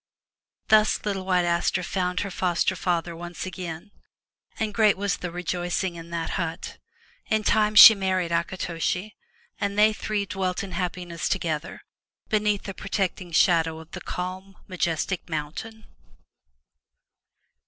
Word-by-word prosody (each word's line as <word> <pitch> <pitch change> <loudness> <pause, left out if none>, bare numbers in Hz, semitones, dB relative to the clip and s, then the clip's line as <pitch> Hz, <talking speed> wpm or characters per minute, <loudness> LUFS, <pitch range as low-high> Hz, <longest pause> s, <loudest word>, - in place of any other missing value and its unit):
Thus 215 -1 +4
little 195 -2 -2
White 180 -2 +2
Aster 175 +1 +1
found 180 0 -1
her 200 - -4
foster 180 -2 0
father 170 -1 -1
once 175 +1 -7
again, 180 0 -7 0.7
and 215 -2 -1
great 215 -2 +4
was 200 -1 -1
the 180 - -5
rejoicing 175 +1 -2
in 170 0 -10
that 170 -1 -3
hut. 165 +2 -5 0.5
In 215 0 +1
time 215 0 +2
she 220 - +12
married 185 -4 -1
Akitoshi, 175 +3 -2 0.4
and 200 0 -2
they 215 +1 +5
three 210 -1 -2
dwelt 185 -1 -2
in 195 - -7
happiness 175 -2 -3
together, 165 -4 -3 0.5
beneath 210 -1 +1
the 195 - -6
protecting 185 -1 -3
shadow 165 -1 +3
of 160 0 -14
the - - -7
calm, 185 +2 -6
majestic 175 0 -2
mountain. 165 +9 -5
180 Hz, 130 wpm, -25 LUFS, 170-200 Hz, 0.7 s, she